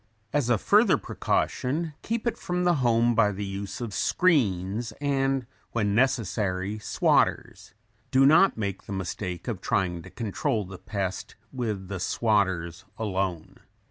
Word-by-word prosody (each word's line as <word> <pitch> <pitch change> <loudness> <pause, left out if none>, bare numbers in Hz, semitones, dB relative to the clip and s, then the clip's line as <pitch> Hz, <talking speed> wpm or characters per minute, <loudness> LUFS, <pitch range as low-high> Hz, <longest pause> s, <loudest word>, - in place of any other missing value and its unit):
As 140 -4 +1
a 120 - +4
further 205 - +4
precaution 155 +5 -1
keep 230 +1 -3
it 235 - 0
from 180 0 -2
the 175 -2 +3
home 120 -1 +3
by 105 -2 +3
the 100 +1 -4
use 100 0 -5
of 115 -4 -4
screens 110 - +1
and 135 -1 0 0.3
when 105 -3 +1
necessary 105 -4 0
"swatters." 105 - 0 0.3
Do 135 +1 +4
not 160 +5 +5
make 100 -3 -3
the 100 - -6
mistake 90 -1 -4
of - - -3
trying 90 -3 0
to - - -12
control 110 -1 -2
the 90 0 -10
pest 95 -3 -4 0.2
with 110 -7 -3
the 95 -1 -5
"swatters" 95 -5 0
alone. 95 -6 -3
105 Hz, 140 wpm, -26 LUFS, 95-130 Hz, 0.3 s, not